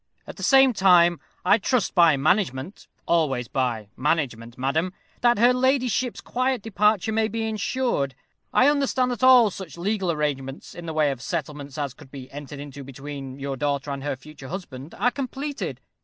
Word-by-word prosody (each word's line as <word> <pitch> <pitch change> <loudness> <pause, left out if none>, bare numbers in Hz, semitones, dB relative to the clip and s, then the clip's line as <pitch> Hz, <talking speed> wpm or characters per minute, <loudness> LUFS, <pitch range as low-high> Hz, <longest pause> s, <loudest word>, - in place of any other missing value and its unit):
At - - -9
the - - -9
same 270 -2 +5
time, 175 -4 +5 0.3
I 205 - +5
trust 245 +3 0
by 170 -5 +5
management 145 +1 0 0.2
always 135 -8 +1
by 120 -6 -2
management, 130 -6 -1
madam 155 +8 0 0.3
that 240 -2 +4
her 240 +3 +5
ladyship's 255 -2 +1
quiet 255 -3 -1
departure 210 -1 +2
may 220 0 +1
be 225 0 -3
ensured. 215 - -1 0.4
I 255 - +5
understand 275 -3 +2
that 245 - -4
all 250 -5 +7
such 180 -4 -9
legal 190 0 0
arrangements 140 -3 -3
in 175 -1 -9
the 160 - -3
way 155 -2 +2
of 130 -3 -6
settlements 145 -1 -5
as 140 -4 -3
could 135 - -16
be 135 -2 -10
entered 145 0 -8
into 140 -1 -8
between 135 0 -8
your 140 0 -4
daughter 140 +1 -2
and 140 -1 -5
her 145 - -2
future 140 +1 -12
husband 155 -4 -8
are 245 - +2
completed. 275 +2 -4
165 Hz, 170 wpm, -24 LUFS, 140-225 Hz, 0.4 s, all